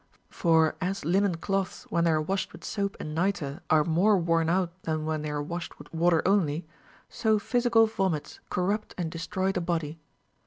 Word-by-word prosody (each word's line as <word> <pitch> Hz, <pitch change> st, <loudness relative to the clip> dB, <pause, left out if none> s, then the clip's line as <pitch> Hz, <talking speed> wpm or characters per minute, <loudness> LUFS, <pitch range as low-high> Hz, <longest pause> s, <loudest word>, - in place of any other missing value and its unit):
For 160 Hz, -3 st, +3 dB
as 190 Hz, -2 st, -2 dB
linen 190 Hz, +2 st, +2 dB
cloths, 195 Hz, +3 st, -2 dB
when 170 Hz, 0 st, +2 dB
they -, -, +4 dB
are 155 Hz, -1 st, +3 dB
washed 190 Hz, +5 st, -2 dB
with 170 Hz, -, -12 dB
soap 200 Hz, -2 st, -2 dB
and 150 Hz, -, -5 dB
nitre, 165 Hz, -3 st, -1 dB
are 155 Hz, -1 st, +5 dB
more 180 Hz, +6 st, +3 dB
worn 165 Hz, -2 st, +1 dB
out 180 Hz, 0 st, +1 dB
than 155 Hz, -2 st, -2 dB
when 155 Hz, -1 st, -1 dB
they 150 Hz, -, -3 dB
are 145 Hz, 0 st, -2 dB
washed 170 Hz, +3 st, -6 dB
with -, -, -14 dB
water 165 Hz, 0 st, +3 dB
only, 170 Hz, -5 st, +2 dB, 0.4 s
so 220 Hz, -2 st, +1 dB
physical 235 Hz, +1 st, +3 dB
vomits 190 Hz, -8 st, -2 dB
corrupt 200 Hz, +4 st, -1 dB
and 170 Hz, -3 st, -2 dB
destroy 190 Hz, +3 st, -1 dB
the 185 Hz, -, -2 dB
body. 165 Hz, -2 st, -2 dB
170 Hz, 185 wpm, -28 LUFS, 160-195 Hz, 0.4 s, are